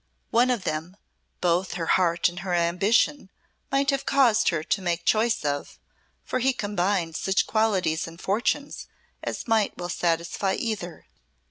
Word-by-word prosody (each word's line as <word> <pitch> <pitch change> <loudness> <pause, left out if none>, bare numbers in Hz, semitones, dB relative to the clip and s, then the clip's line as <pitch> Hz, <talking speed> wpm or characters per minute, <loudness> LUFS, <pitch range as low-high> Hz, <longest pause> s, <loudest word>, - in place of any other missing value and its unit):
One 240 +2 +4
of 240 -6 0
them, 160 +5 -4 0.4
both 180 +1 +1
her 170 -2 -3
heart 170 -1 +3
and 175 +1 -6
her 180 -1 -2
ambition 190 - +2 0.4
might 275 +1 +2
have 275 -1 -1
caused 255 -6 +4
her 160 -4 -1
to 195 - -1
make 175 -2 -2
choice 225 -5 +2
of, 145 0 -3 0.5
for 255 - -2
he 265 +2 +2
combined 195 -6 -1
such 190 +3 +1
qualities 195 -8 +1
and 165 0 -11
fortunes 235 +10 -1 0.4
as - - -4
might 220 -3 +1
well 175 0 -5
satisfy 170 +2 0
either. 200 -7 -4
190 Hz, 150 wpm, -25 LUFS, 170-225 Hz, 0.5 s, One